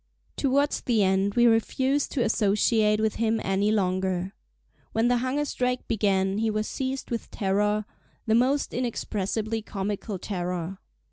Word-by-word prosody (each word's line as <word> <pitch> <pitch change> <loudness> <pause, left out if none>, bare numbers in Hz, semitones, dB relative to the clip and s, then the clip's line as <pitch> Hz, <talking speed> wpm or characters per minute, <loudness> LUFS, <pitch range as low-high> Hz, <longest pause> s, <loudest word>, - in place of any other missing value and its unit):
Towards 280 +2 +1
the 225 -4 +2
end 195 +1 +1
we 240 0 +5
refused 260 +5 +2
to 250 - +1
associate 210 0 +2
with 220 -1 0
him 225 0 +1
any 195 +2 +1
longer. 185 -2 0 0.6
When 225 +2 +2
the 245 - +3
hunger 260 +4 -1
strike 250 -2 -2
began 195 -2 +1
he 225 0 +1
was 215 0 -1
seized 265 -1 -4
with 230 - -3
terror—the 210 +3 -2
most 260 +5 +2
inexpressibly 220 -2 -2
comical 205 0 -4
terror. 180 -1 -4
215 Hz, 135 wpm, -26 LUFS, 195-240 Hz, 0.6 s, we